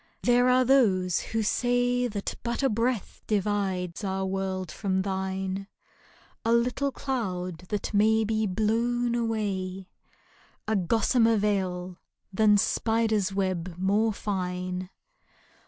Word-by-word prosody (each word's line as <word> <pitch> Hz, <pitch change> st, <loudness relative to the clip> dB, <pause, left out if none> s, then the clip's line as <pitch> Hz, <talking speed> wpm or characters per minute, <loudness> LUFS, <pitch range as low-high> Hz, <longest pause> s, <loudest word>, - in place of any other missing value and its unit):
There 245 Hz, +1 st, +4 dB
are 255 Hz, 0 st, +4 dB
those 195 Hz, -10 st, +3 dB
who 225 Hz, 0 st, -2 dB
say 245 Hz, +2 st, +1 dB
That 205 Hz, -3 st, -4 dB
but 235 Hz, +3 st, -2 dB
a 270 Hz, -, +4 dB
breath 230 Hz, 0 st, -1 dB
divides 195 Hz, -3 st, -1 dB
our 190 Hz, -1 st, -1 dB
world 190 Hz, -2 st, -3 dB
from 190 Hz, -2 st, -1 dB
thine; 190 Hz, 0 st, -3 dB, 0.8 s
A 230 Hz, -, +1 dB
little 250 Hz, +4 st, +1 dB
cloud 185 Hz, -12 st, -3 dB
that 210 Hz, +1 st, -3 dB
may 220 Hz, +2 st, +4 dB
be 220 Hz, 0 st, 0 dB
blown 235 Hz, +4 st, 0 dB
away 195 Hz, -5 st, -2 dB, 0.4 s
— -, -, -32 dB
A 220 Hz, -, +1 dB
gossamer 225 Hz, +4 st, +3 dB
veil 185 Hz, -3 st, -1 dB, 0.3 s
than 210 Hz, +1 st, +5 dB
spider's 220 Hz, -2 st, +1 dB
web 185 Hz, -3 st, -2 dB
more 205 Hz, +4 st, +2 dB
fine. 185 Hz, -2 st, -3 dB
205 Hz, 120 wpm, -27 LUFS, 190-230 Hz, 0.8 s, than